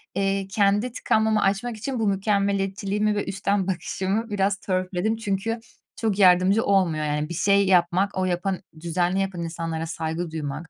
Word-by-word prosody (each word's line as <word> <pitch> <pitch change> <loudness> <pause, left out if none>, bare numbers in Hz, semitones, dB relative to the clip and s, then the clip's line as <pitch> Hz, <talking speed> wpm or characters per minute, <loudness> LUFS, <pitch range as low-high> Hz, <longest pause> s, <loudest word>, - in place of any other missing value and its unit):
eee, 195 0 0
kendi 205 +4 +2
tıkanmamı 220 -2 +1
açmak 215 +4 0
için 250 +3 -4
bu 220 - +1
mükemmeliyetçiliğimi 200 +1 0
ve 205 - -1
üstten 195 0 -1
bakışımı 195 +4 -2
biraz 200 -1 +1
törpüledim 185 +3 -1
çünkü 225 +2 -2 0.4
çok 215 -3 -1
yardımcı 185 +3 +5
olmuyor, 170 -6 +2
yani. 150 +1 -1
Bir - - -4
şey 200 +3 +3
yapmak, 185 +2 +2
o 185 - +1
yapan 185 +1 -1 0.2
düzenli 175 +2 0
yapan 190 -3 -3
insanlara 165 -1 -4
saygı 160 +1 -4
duymak, 155 +1 -5
195 Hz, 150 wpm, -24 LUFS, 175-205 Hz, 0.4 s, yardımcı